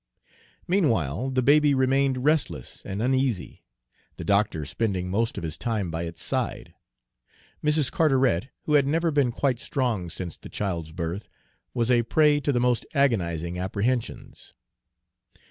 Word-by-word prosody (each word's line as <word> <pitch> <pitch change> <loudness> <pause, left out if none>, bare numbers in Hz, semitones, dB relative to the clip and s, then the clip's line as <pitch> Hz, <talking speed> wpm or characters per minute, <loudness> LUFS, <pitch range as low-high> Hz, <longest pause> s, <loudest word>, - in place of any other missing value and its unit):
Meanwhile 120 - +1
the 130 -1 0
baby 145 +1 +5
remained 130 0 +2
restless 150 0 0
and 100 +2 -4
uneasy, 130 -5 0 0.6
the - - -6
doctor 100 -7 +1
spending 95 -1 -2
most 115 +4 0
of - - -4
his 80 -2 -4
time 105 -7 -2
by 80 +1 -3
its 85 -1 -6
side. - - -2 0.9
Mrs. 150 -3 +2
Carteret, 130 - +2 0.2
who 150 - -1
had 140 -2 +4
never 165 +3 +1
been 140 -5 +2
quite 125 0 0
strong 115 -12 -1
since 85 0 -5
the - - -12
child's 85 -6 -3
birth, 85 +4 -5 0.5
was 120 0 +1
a 120 -1 +5
prey 150 +5 +3
to 145 - 0
the 125 - +1
most 125 -1 +2
agonizing 90 - 0
apprehensions. 110 +6 -3
120 Hz, 145 wpm, -26 LUFS, 90-140 Hz, 0.9 s, baby